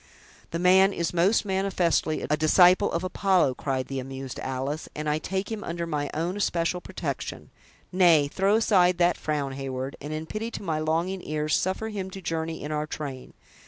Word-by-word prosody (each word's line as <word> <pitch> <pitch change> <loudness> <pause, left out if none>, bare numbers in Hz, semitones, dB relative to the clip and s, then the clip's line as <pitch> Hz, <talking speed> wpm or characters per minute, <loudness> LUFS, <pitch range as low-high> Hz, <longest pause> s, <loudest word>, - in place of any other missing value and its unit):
"The 165 - -3
man 190 +3 +5
is, 170 0 -2
most 185 +6 +3
manifestly, 190 -5 0
a 150 - +2
disciple 180 +5 +5
of 170 - -2
Apollo," 185 -5 +2
cried 130 -1 -2
the 135 -1 -4
amused 135 0 -6
Alice, 135 +4 -3
"and 150 0 -4
I 150 +1 +1
take 190 +6 -3
him 220 -2 -4
under 170 0 -3
my 150 -3 -2
own 170 +4 -1
especial 180 -3 0
protection. - - -5 0.4
Nay, 170 -6 +5
throw 195 +7 +2
aside 185 -5 +4
that 175 0 +3
frown, 145 -3 -2
Heyward, 135 0 -4
and 145 +2 -6
in 155 +1 -4
pity 215 +6 -4
to - - -9
my 160 -4 -1
longing 165 +4 -1
ears, 150 0 0
suffer 190 +4 -1
him 195 -3 -4
to 195 - -8
journey 165 -3 -3
in 150 - -4
our 150 0 -2
train. 140 -5 -7
165 Hz, 185 wpm, -26 LUFS, 150-185 Hz, 0.4 s, man